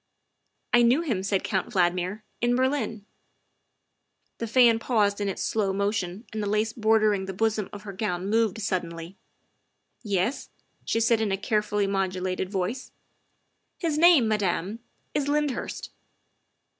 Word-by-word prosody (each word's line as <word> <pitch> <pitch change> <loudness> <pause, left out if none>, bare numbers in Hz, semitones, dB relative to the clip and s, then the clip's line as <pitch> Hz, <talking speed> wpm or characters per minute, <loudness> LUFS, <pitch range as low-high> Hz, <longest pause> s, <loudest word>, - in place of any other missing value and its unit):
" - - -49
I 240 - +6
knew 240 +6 +4
him," 240 - -1
said 195 0 0
Count 195 +3 -2
Valdmir, 180 +1 0
" - - -44
in 240 +1 +2
Berlin." 255 -5 -1 1.3
The 230 - -3
fan 230 -1 +5
paused 210 -4 +1
in 200 - 0
its 195 - -3
slow 205 -3 0
motion 200 0 -2
and 215 - -3
the 205 - -2
lace 215 +1 0
bor 220 -1 +3
dering 205 -3 +1
the 190 - -5
bosom 220 -1 0
of 205 0 -9
her 200 -2 -7
gown 185 -2 -2
moved 220 -1 +1
suddenly. 175 -3 -3 0.5
" - - -44
Yes?" 225 +10 -1 0.4
she 225 - 0
said 230 0 +3
in 215 -2 0
a 195 - +1
carefully 210 0 0
modulated 185 -1 -1
voice. 200 +6 -3 0.3
' - - -46
' - - -30
His 310 -3 0
name, 330 -8 +6
Madame, 205 0 -1 0.3
is 285 -1 0
Lyndhurst. 295 -2 -2
210 Hz, 160 wpm, -26 LUFS, 195-230 Hz, 1.3 s, I